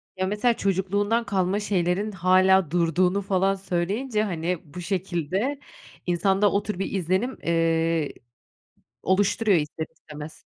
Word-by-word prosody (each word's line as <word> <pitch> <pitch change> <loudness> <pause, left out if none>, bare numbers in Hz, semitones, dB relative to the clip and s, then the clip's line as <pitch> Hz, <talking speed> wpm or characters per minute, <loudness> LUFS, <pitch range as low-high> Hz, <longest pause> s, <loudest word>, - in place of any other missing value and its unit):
Ya, 185 0 -1
mesela 210 +4 +2
çocukluğundan 200 +4 0
kalma 195 -1 0
şeylerin 195 +1 0
hâlâ 185 -2 +4
durduğunu 180 +3 +2
falan 195 0 +1
söyleyince, 200 +5 -1
hani, 175 -3 -2
bu 180 - -6
şekilde 190 - -2 0.5
insanda 195 +3 +2
o 200 - +1
tür 210 -4 -4
bir 195 - -2
izlenim, 190 +7 -1
eee, 165 -2 +1 0.9
oluşturuyor 205 +1 +2
ister 155 +1 -3
istemez. 150 0 -10
190 Hz, 120 wpm, -25 LUFS, 175-205 Hz, 0.9 s, hâlâ